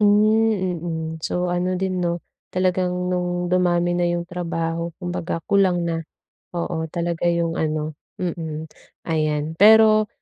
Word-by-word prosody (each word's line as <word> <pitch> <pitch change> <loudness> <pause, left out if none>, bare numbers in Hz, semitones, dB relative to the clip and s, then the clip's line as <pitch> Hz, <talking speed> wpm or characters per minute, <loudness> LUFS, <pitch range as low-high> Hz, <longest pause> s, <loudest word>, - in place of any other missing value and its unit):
Hmm, 210 -2 +3
mm. 160 -2 -3 0.2
So 180 +2 -1
ano 180 +1 0
din 185 -1 -1
'no, 170 0 0 0.3
talagang 185 0 +1 0.2
nung 180 -1 -1
dumami 175 -1 +2
na 175 - 0
yung 175 0 -2
trabaho 170 -1 -3
kumbaga 175 -2 -3
kulang 185 -3 +3
na, 165 -1 -1 0.5
oo, 170 -1 -2
talaga 170 0 -1
yung 170 -1 +1
ano 155 -1 -1 0.3
mm. 160 -3 -4 0.3
Ayan, 155 -1 -1
pero 215 +1 +7
175 Hz, 130 wpm, -22 LUFS, 165-185 Hz, 0.5 s, pero